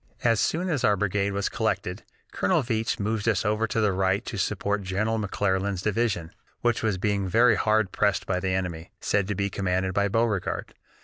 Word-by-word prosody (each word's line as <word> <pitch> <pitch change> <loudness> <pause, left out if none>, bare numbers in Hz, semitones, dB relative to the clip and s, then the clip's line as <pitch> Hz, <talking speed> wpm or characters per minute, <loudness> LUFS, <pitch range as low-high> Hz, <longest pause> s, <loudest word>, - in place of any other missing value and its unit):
"As 115 -3 +3
soon 175 +3 0
as 150 -8 -1
our 105 -5 +4
brigade 100 0 0
was 100 0 -1
collected, - - -2 0.3
Colonel 95 +10 +1
Veatch 115 -2 -1
moved 110 +1 0
us 110 -1 +1
over 105 +2 +1
to 110 - -1
the 105 -2 +3
right 95 +4 +1
to 120 - -5
support 100 +2 -1
General 105 +4 -1
McClernand's 100 -2 -1
division, 105 -6 0 0.3
which 120 -1 +1
was 110 -4 0
being 100 0 0
very 115 +5 +5
hard 110 -3 +2
pressed 100 -2 +1
by 90 -1 0
the 95 0 -2
enemy, 90 -3 -2
said 100 -2 0
to 105 - -2
be 100 +1 -1
commanded 95 0 -1
by 100 +1 +2
Beauregard. 110 -2 -1
100 Hz, 190 wpm, -26 LUFS, 95-110 Hz, 0.3 s, very